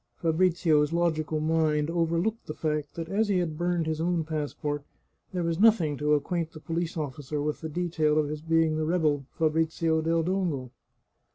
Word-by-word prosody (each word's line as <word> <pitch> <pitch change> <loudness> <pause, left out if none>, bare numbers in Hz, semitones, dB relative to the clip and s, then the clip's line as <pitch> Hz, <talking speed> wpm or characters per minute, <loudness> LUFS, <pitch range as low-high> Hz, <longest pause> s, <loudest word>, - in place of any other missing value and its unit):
Fabrizio's 165 -3 +2
logical 160 -2 0
mind 155 -1 +1
overlooked 170 +6 0
the 155 - -5
fact 150 -2 -2
that 165 -1 -4
as 210 +5 +1
he 200 -2 +2
had 170 -4 -1
burned 175 0 0
his 160 0 -2
own 170 -1 +1
passport, 150 -1 -3 0.5
there 180 -2 -2
was 165 0 -1
nothing 195 -9 +4
to 150 +2 +2
acquaint 165 +2 -2
the 155 - -9
police 165 +1 -3
officer 145 0 -4
with 150 +1 -2
the 160 - -4
detail 155 -2 0
of 155 -1 +2
his 150 0 -5
being 165 -1 +2
the 155 - 0
rebel 155 -5 +1
Fabrizio 160 0 +1
del 165 +1 +1
Dongo. 165 -9 -1
160 Hz, 175 wpm, -28 LUFS, 150-170 Hz, 0.5 s, nothing